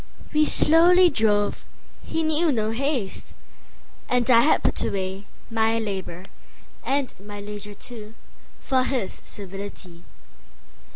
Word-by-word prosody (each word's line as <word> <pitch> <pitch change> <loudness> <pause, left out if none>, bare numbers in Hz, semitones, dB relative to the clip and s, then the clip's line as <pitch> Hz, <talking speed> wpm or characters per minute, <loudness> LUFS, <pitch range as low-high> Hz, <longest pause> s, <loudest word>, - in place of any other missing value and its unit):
We 305 0 +4
slowly 345 +4 +6
drove, 210 -4 +1 0.4
he 325 - -2
knew 315 +1 +2
no 220 -4 0
haste, 255 -4 -3 0.7
And 245 -1 +1
I 230 - +8
had 300 - +3
put - - +1
awayMy 190 0 -2 0.3
labour, 220 -5 -1 0.6
and 275 -1 -1
my 205 0 -8
leisure 205 0 -7
too, 220 -1 -9 0.4
For 260 -2 +1
his 255 -7 -3
civility. 195 -3 -8
225 Hz, 110 wpm, -24 LUFS, 205-275 Hz, 0.7 s, I